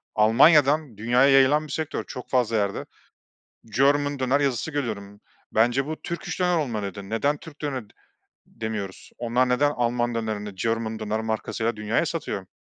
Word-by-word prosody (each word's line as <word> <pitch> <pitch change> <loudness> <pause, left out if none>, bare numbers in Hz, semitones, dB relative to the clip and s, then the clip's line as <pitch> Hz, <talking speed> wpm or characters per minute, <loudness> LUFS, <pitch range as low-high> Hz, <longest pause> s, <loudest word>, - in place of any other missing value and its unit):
Almanya'dan 140 - +5
dünyaya 120 +5 +3
yayılan 140 +3 +5
bir - - -10
sektör. 160 -1 -3
Çok 125 - -9
fazla 120 -3 +1
yerde 100 -1 -1 0.8
German 145 +4 +2
döner 130 +2 +2
yazısı 140 +2 0
görüyorum, 105 -8 -4 0.3
bence 120 +5 +2
bu 155 0 -6
Turkish 170 +2 -5
döner 180 -1 +3
olmalıydı. 105 - -3
Neden 140 +6 +1
Türk 150 0 -13
döne 140 -5 -3 0.6
demiyoruz? 105 -4 -6
Onlar 125 +2 +1
neden 145 +4 +3
Alman 120 -2 0
dönerini 105 -3 -3
German 115 +2 -2
döner 110 0 -2
markasıyla 110 +1 -2
dünyaya 105 +1 0
satıyor? - - -4
120 Hz, 145 wpm, -25 LUFS, 110-145 Hz, 0.8 s, Almanya'dan